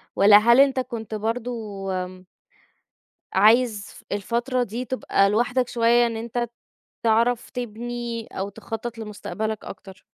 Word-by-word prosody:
والَّا 205 +1 +8
هل 235 +4 +5
أنت 275 -1 +5
كنت 230 -4 -5
برضه 220 -3 -4 0.2
آمم 185 0 -13 1.1
عايز 215 +1 +4
ف 240 - -15
الفترة 240 +5 -1
دي 240 +2 -5
تبقى 200 -6 +1
لوحدك 245 +4 +1
شوية 235 0 +3
إن 230 -1 -4
أنت 235 +1 -3 0.5
تعرَف 230 +1 +2
تبنْي 240 -1 -5
أو 195 +1 -5
تخطّط 225 +3 -6
لمستقبلك 215 0 -5
أكتر؟ 190 -2 -11
230 Hz, 125 wpm, -24 LUFS, 210-240 Hz, 1.1 s, والَّا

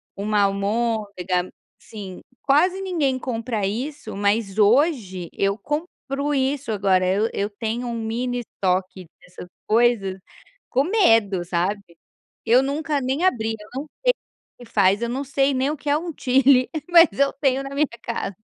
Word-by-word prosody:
uma 205 +1 0
almôndega 200 -3 -1 0.3
sim, 195 -4 -9 0.2
quase 355 +7 +3
ninguém 320 -9 0
compra 230 -4 -3
isso, 240 +2 -4
mas 205 0 0
hoje 210 - +2
eu 200 +1 0
compro 295 - -3
isso, 265 -2 -1
agora 190 -3 +2
eu 205 +4 +2
eu 200 +1 -1
tenho 230 +3 -4
um 235 -1 -3
mini 245 +2 -2
estoque 185 -4 -2
dessas 180 0 -12 0.2
coisas, 215 -4 +2 0.5
com 265 +2 +2
medo, 225 - +3
sabe. 180 +4 -1 0.6
Eu 240 +3 +5
nunca 290 +1 -1
nem 265 +7 -1
abri, 225 -10 +1
eu 210 - -13
não 280 +3 -4 0.2
sei - - +6
o - - -12 0.4
que 245 - -11
que 230 - -21
faz, 200 +1 +3
eu 235 - -1
não 265 +3 -2
sei 275 +1 +1
nem 265 +3 +1
o 305 - -4
que 290 - -5
é 290 - +3
um 330 0 -5
chilli, 255 0 +4 0.2
mas 335 -1 +8
eu 280 0 +3
tenho 270 -1 0
na 275 0 -7
minha 295 0 +2
casa. 205 -5 -4
235 Hz, 160 wpm, -22 LUFS, 200-275 Hz, 0.6 s, mas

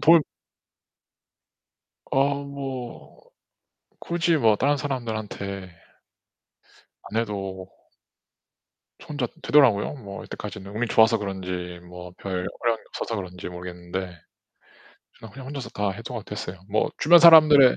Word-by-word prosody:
돌 165 0 +7 1.9
어 140 +1 +1
뭐 135 -3 -7 0.8
굳이 170 -1 +1
뭐 110 -5 +4
다른 145 +6 +2
사람들한테 110 -8 -4 1.4
안 110 - -4
해도 95 -4 -5 1.3
저 - - -15
혼자 145 -5 -2 0.2
되더라고요, 135 -6 +4
뭐 100 -7 -8
이때까지는. 95 +1 -8
운이 120 +1 0
좋아서 110 0 +5
그런지 90 -3 -5
뭐 90 0 -10
별 90 -2 -3
어려움이 115 -2 0
없어서 115 - -4
그런지 90 -3 -6
모르겠는데 90 +1 -6 1.2
그냥 110 -3 -12
그냥 130 +3 -10
혼자서 140 -1 -6
다 100 -1 -1
해소 115 +5 -7
가 115 - -4
됐어요. 95 -4 -7
뭐 - - +1
주변 170 +3 +7
사람들의 155 -5 +8
110 Hz, 255 characters per minute, -25 LUFS, 95-140 Hz, 1.9 s, 사람들의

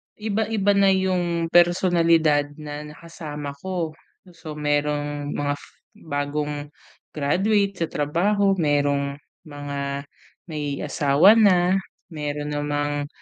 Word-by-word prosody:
iba-iba 215 -1 0
na 200 0 +4
yung 180 -3 +1
personalidad 170 -4 +4
na 150 0 -7
nakasama 150 -4 -7
ko. 180 -2 -3 0.4
So 160 -2 -9
merong 145 0 -1
mga 145 0 0
f - - -14 0.3
bagong 145 0 -3 0.4
graduate 195 +6 +1
sa - - -1
trabaho, 195 +7 +1
merong 145 -3 +1 0.3
mga 140 -1 -4 0.5
may 145 -2 -3
asawa 145 +6 +5
na, 185 -2 +4 0.3
meron 150 -1 -4
namang 145 0 -1
150 Hz, 100 wpm, -23 LUFS, 145-180 Hz, 0.5 s, asawa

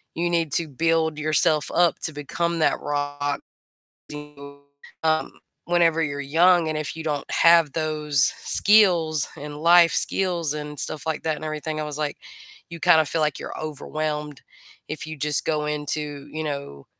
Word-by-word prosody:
you 175 +1 0
need 165 -3 0
to 170 - +1
build 160 +2 0
yourself 155 -1 +1
up 175 -1 +3
to 160 - -3
become 170 +4 -2
that 155 - +2
rock 145 0 -2 0.7
and 150 - -6 0.2
you, 140 0 -12 0.4
um, 160 0 +1 0.3
whenever 165 -2 +2
you're 145 -2 -3 0.2
young, 175 -2 +5
and 155 - -2
if 155 -1 -4
you 160 - -7
don't 145 -3 -3
have 165 -3 +5
those 150 -4 0 0.2
skills, 175 -8 +4
and 145 0 -7
life 170 +2 +5
skills, 175 -6 0
and 150 -1 -6
stuff 155 -1 -3
like 160 -1 -3
that, 160 -1 0
and 155 - -7
everything. 155 0 -4
I - - -2
was 145 - -5
like, 150 -1 -3 0.5
you 170 -1 -8
kind 175 -2 +6
of 155 - -3
feel 165 - -1
like 150 -2 0
you're - - -7
overwhelmed 150 -1 -4 0.5
if 155 0 -5
you 155 - -6
just 150 -1 0
go 150 -1 0
into, 150 -1 -4
you 155 0 -4
know, 140 - -6
155 Hz, 175 wpm, -23 LUFS, 150-165 Hz, 0.7 s, kind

